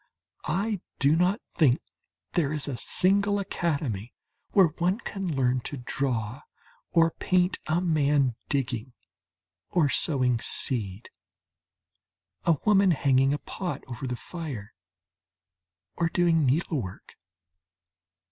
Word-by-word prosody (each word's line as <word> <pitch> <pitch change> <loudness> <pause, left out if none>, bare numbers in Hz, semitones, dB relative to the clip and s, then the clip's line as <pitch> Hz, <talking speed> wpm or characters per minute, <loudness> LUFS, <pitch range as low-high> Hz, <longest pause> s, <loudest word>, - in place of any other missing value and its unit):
I 195 +4 -1 0.2
do 140 +3 +4
not 180 +6 +2
think 140 -7 +4 0.5
there 150 -5 +1
is 150 -2 -2
a 140 - -2
single 200 +8 +2
academy 145 - -2 0.3
where 190 -5 +5
one 180 +3 +2
can 195 -8 -4
learn 130 -1 +2
to 145 - -4
draw 125 -1 -2 0.5
or 165 0 +4
paint 180 +2 +1
a 160 +3 +1
man 145 -7 +2
digging 125 -3 -2 0.8
or 160 -5 +2
sowing 130 -6 +2
seed, 110 -5 -2 1.3
a 170 - +5
woman 200 -2 +5
hanging 135 -4 +3
a 145 - +1
pot 180 +4 -5
over 130 +1 -6
the 125 - -2
fire 135 - -7 1.2
or 170 -1 +1
doing 165 -4 +3
needlework. 130 - -2
150 Hz, 110 wpm, -27 LUFS, 130-175 Hz, 1.3 s, where